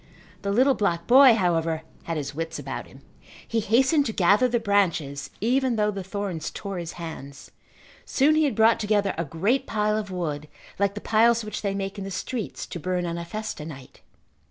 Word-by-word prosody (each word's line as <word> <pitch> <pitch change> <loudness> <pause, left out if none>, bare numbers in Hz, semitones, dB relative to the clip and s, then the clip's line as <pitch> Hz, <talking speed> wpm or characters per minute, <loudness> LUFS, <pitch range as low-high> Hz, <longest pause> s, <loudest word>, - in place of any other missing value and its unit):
The 200 - -3
little 260 +6 +4
black 170 -7 -1
boy, 255 +1 +8
however, 165 -5 0 0.2
had 165 -1 -2
his 145 -1 -4
wits 165 +2 -4
about - - -6
him. - - -16 0.5
He 230 - 0
hastened 265 +7 +3
to - - -1
gather 205 +5 +4
the 240 -1 0
branches 175 -10 0
even 255 +2 +2
though 210 -1 +1
the 195 -2 -5
thorns 190 -4 -4
tore 195 -3 -6
his 170 -1 -6
hands. 155 -4 -9 0.5
Soon 285 +3 +3
he 310 0 +3
had 270 -7 0
brought 225 +2 +4
together 205 -2 +1
a 165 - -2
great 185 - 0
pile 210 -1 0
of 205 -2 -6
wood 155 -5 -4 0.3
like 200 0 +1
the 210 - -5
piles 230 +1 +3
which 215 - -5
they 200 -2 -1
make 195 +1 -4
in - - -4
the 195 - -5
streets 210 +4 -4
to 175 - -7
burn 180 +1 -1
on 170 0 -3
a 170 - -5
festa 215 -3 -5
night. 140 -4 -11
200 Hz, 200 wpm, -25 LUFS, 170-225 Hz, 0.5 s, boy